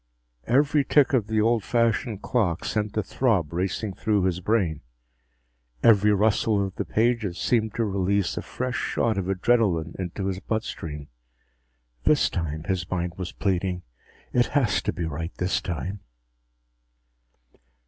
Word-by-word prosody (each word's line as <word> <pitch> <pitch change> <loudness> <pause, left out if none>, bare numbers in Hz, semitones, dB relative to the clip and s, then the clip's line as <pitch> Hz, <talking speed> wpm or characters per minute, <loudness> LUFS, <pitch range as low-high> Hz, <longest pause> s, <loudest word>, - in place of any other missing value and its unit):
Every 140 +4 +3
tick 145 +1 +3
of 115 -6 +2
the 110 -1 0
old 115 0 +2
fashioned 115 -2 0
clock 95 -9 0
sent 105 -1 -2
a 110 - +1
throb 95 - 0
racing 95 +3 -2
through 105 -1 0
his 90 -1 0
brain. 90 -6 0 1.0
Every 105 -2 +6
rustle 105 0 +2
of 95 - -6
the - - -4
pages 110 -5 0
seemed 110 -3 0
to 115 - +1
release 100 -1 0
a - - -3
fresh 125 0 -4
shot 110 -4 0
of 95 0 -3
adrenalin 95 -5 +1
into 95 +1 -4
his 95 -1 -2
blood 110 +3 -2
stream. 75 -2 -7 0.9
This - - +3
time, 80 -2 -3
his 90 -2 -2
mind 90 -1 -2
was 90 -2 -4
pleading. 90 -2 -1 0.5
_It 120 0 +3
has 120 -7 +2
to - - -1
be 85 - -4
right 80 +2 -5
this 95 +1 0
time.... 95 +2 -4
100 Hz, 150 wpm, -25 LUFS, 90-115 Hz, 1.0 s, Every